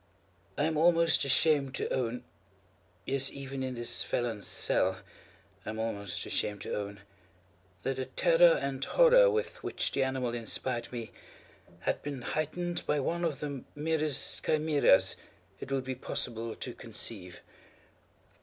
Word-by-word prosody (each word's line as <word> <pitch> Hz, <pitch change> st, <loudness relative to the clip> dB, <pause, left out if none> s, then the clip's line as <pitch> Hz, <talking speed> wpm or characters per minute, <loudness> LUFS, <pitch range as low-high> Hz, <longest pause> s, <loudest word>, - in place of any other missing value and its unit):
I -, -, +1 dB
am 160 Hz, -1 st, +1 dB
almost 165 Hz, -1 st, +4 dB
ashamed 140 Hz, 0 st, +3 dB
to -, -, -2 dB
own—yes, 100 Hz, 0 st, -4 dB
even 135 Hz, -1 st, -6 dB
in 130 Hz, -1 st, -3 dB
this 120 Hz, 0 st, -1 dB
felon's 115 Hz, -4 st, -2 dB
cell, -, -, +1 dB, 0.7 s
I -, -, -6 dB
am 110 Hz, -, -4 dB
almost 100 Hz, -4 st, -3 dB
ashamed 105 Hz, -1 st, -1 dB
to -, -, -4 dB
own—that 95 Hz, +1 st, -8 dB
the 130 Hz, -, -2 dB
terror 170 Hz, +4 st, +5 dB
and 135 Hz, -1 st, -3 dB
horror -, -, +6 dB
with 450 Hz, -1 st, -2 dB
which -, -, -2 dB
the 140 Hz, -, 0 dB
animal 130 Hz, -2 st, -1 dB
inspired 120 Hz, +1 st, -2 dB
me, 120 Hz, -2 st, -6 dB, 0.7 s
had -, -, -1 dB
been 140 Hz, -4 st, -5 dB
heightened 170 Hz, +5 st, -2 dB
by 150 Hz, -, +2 dB
one 170 Hz, +5 st, -1 dB
of 150 Hz, -5 st, -1 dB
the 140 Hz, -3 st, -4 dB
merest 155 Hz, -1 st, -1 dB
chimaeras 150 Hz, -12 st, +3 dB, 0.4 s
it -, -, -8 dB
would 135 Hz, -1 st, 0 dB
be 130 Hz, 0 st, -3 dB
possible 115 Hz, -2 st, -3 dB
to 125 Hz, -, -6 dB
conceive. 105 Hz, -6 st, -6 dB
130 Hz, 135 wpm, -31 LUFS, 110-150 Hz, 0.7 s, horror